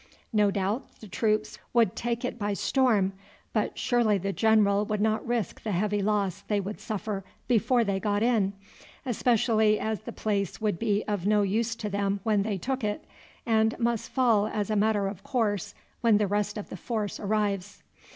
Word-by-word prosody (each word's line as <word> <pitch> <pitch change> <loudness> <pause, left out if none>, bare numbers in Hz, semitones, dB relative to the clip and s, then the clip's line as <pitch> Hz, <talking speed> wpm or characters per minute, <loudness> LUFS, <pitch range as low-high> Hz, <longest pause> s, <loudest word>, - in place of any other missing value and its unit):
No 210 -1 +4
doubt 200 +5 -2
the 215 - -11
troops 215 +2 0
could 230 -6 +3
take 240 +1 -2
it 245 - -4
by 205 -1 -1
storm, 210 -4 +2 0.4
but - - -1
surely 235 -4 +2
the 195 +1 -2
general 210 -2 +3
would 210 0 -2
not 215 +1 +1
risk 235 -6 -2
the 215 - -3
heavy 205 +3 0
loss 200 -2 0
they 205 0 -1
would 200 +2 -5
suffer 210 -2 -4 0.2
before 240 +1 +3
they 200 -3 -1
got 205 +1 0
in, 220 -5 +2 0.5
especially 220 -3 +2
as 220 -1 -2
the 215 - -8
place 200 -4 -2
would 210 -5 -1
be 210 -2 +1
of 205 -3 -1
no 210 -1 +4
use 225 +4 0
to 225 -2 -4
them 200 0 -1
when 215 -2 +2
they 205 -1 -1
took 260 +6 -3
it, 210 0 -2 0.4
and 220 -1 +2
must 235 -2 -1
fall 230 -6 +3
as 215 -1 -2
a - - +1
matter 205 -1 +2
of 195 -1 -6
course 210 -7 -1 0.3
when 230 -3 +5
the 210 - +2
rest 205 +1 -1
of 210 - -6
the - - -7
force 215 +1 -3
arrives." 205 -2 -1
210 Hz, 185 wpm, -27 LUFS, 200-225 Hz, 0.5 s, when